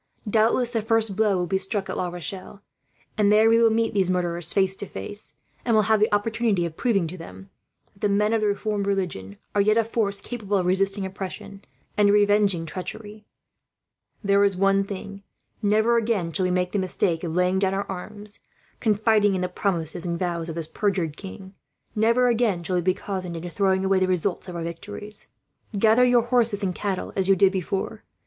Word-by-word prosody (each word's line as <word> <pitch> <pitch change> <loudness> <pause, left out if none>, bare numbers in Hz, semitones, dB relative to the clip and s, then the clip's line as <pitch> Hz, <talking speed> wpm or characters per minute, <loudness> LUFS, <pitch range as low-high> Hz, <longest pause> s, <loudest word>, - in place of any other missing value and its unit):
Doubtless 230 +3 +2
the 230 -2 0
first 225 -2 +1
blow 210 -2 +2
will 180 - 0
be 190 +2 0
struck 195 0 -1
at - - -4
La 180 - -1
Rochelle, 185 +3 -7 0.6
and 205 -1 +4
there 215 +1 +5
we 230 - +5
will 230 - +6
meet 225 +1 0
these 190 -3 +1
murderers 175 -2 0
face 190 -1 +2
to 205 - -5
face; 175 - -7 0.3
and 230 - +2
will 215 - +4
have 220 +1 +3
the 215 - +2
opportunity 210 -2 +1
of 165 -2 -6
proving, 200 -6 +1
to 175 +3 -7
them, 95 - -11 0.4
that - - -25
the 205 - +1
men 210 +2 +2
of 225 - +1
the 210 - +2
Reformed 205 0 -1
religion 170 - -3 0.2
are 205 - +3
yet 215 +2 +3
a 230 - +4
force 215 -3 -1
capable 205 -2 -3
of 185 - 0
resisting 195 +2 +1
oppression, 195 +1 -7 0.4
and 205 -1 +5
revenging 205 -4 +3
treachery. 205 +5 -7 1.0
There 200 0 +3
is 200 -2 +1
one 195 +1 +3
thing: 200 0 -7 0.4
never 220 +3 +3
again 215 -8 -1
shall 185 +2 +1
we - - -1
make 180 0 0
the 205 - 0
mistake 180 -2 0
of 165 -2 -3
laying 180 +1 +2
down 190 0 +1
our 200 - -2
arms, 205 +3 -7 0.4
confiding 210 -2 +2
in 185 - -2
the 180 - -1
promises 175 -3 0
and 170 -1 -2
vows 170 -2 -2
of 160 - -5
this 165 -2 0
perjured 180 -3 -1
king; 190 0 -10 0.4
never 230 +3 +3
again 225 -7 +1
shall 180 +2 -2
we - - +1
be 185 +1 +1
cozened 185 -3 -5
into 175 +1 -6
throwing 190 0 +1
away 190 0 +3
the 185 - +1
results 185 +1 -1
of 180 - -7
our 170 - -4
victories. 205 +5 -7 0.5
"Gather 220 +4 +4
your 245 -1 +4
horses 235 -4 +1
and 185 -2 0
cattle, 195 0 -3
as 190 -1 0
you 195 - +6
did 190 0 +4
before. 195 +3 -3
195 Hz, 205 wpm, -24 LUFS, 180-215 Hz, 1.0 s, will